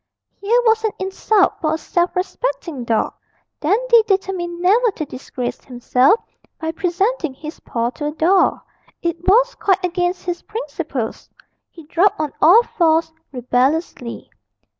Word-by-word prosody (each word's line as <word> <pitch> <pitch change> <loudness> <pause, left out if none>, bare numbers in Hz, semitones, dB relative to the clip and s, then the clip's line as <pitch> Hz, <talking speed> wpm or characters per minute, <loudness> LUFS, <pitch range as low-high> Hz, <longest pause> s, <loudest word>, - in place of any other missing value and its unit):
Here 450 +4 +2
was 445 0 +3
an 435 -3 0
insult 385 +1 +1
for 310 -1 +1
a - - -3
self 345 +2 -1
respecting 365 - -3
dog! 225 -2 0 0.5
Dandy 465 +8 +4
determined 370 -3 -1
never 430 +7 +3
to 310 - -4
disgrace 255 -2 -6
himself 255 - +2 0.4
by 320 0 -2
presenting 355 - -1
his 305 +4 -9
paw 235 0 -2
to 295 +3 -5
a - - -2
doll; 350 +5 +2 0.4
it 340 0 -1
was 485 +6 +4
quite 380 -1 +1
against 355 0 -1
his 350 -1 -3
principles. 300 - -5 0.4
He 330 - -14
dropped 355 +5 +2
on 305 -2 -2
all 390 +9 +7
fours 325 -5 +1 0.2
rebelliously. 255 0 -1
345 Hz, 140 wpm, -19 LUFS, 300-395 Hz, 0.5 s, all